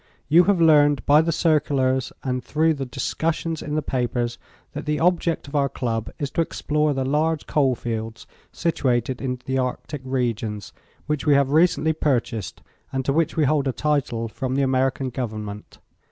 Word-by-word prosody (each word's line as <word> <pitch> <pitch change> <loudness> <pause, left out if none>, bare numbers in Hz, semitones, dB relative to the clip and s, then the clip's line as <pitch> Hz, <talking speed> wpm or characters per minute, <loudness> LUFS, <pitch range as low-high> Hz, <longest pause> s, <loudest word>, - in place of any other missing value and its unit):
You 170 +4 +6
have 200 -3 +3
learned 145 -4 +5
by 150 +2 +6
the 165 +1 0
circulars 140 -5 +1
and 125 -1 -2
through 160 +1 +2
the 135 -3 -5
discussions 160 +4 -2
in 150 - -4
the 155 - 0
papers 120 -2 -2 0.3
that - - -6
the 150 0 0
object 170 -2 +1
of 140 - -8
our 140 -1 +2
Club 115 -4 -3
is 140 -2 -3
to - - +1
explore 150 -2 0
the 135 -1 -1
large 150 +3 0
coal 135 -4 +2
fields 115 -1 -5 0.3
situated 130 -6 -1
in 125 -1 -2
the 130 0 0
Arctic 130 +3 -3
regions, 115 -5 -2 0.3
which 150 0 -2
we 145 - +6
have 140 -1 +2
recently 160 0 +3
purchased 120 - -2 0.3
and 135 -1 -2
to 135 - +1
which 165 +2 0
we 155 - +3
hold 145 0 +1
a - - +2
title 130 -6 -1
from 130 +3 -3
the 140 - +2
American 130 0 0
Government. 110 -4 -6
135 Hz, 175 wpm, -23 LUFS, 125-155 Hz, 0.3 s, You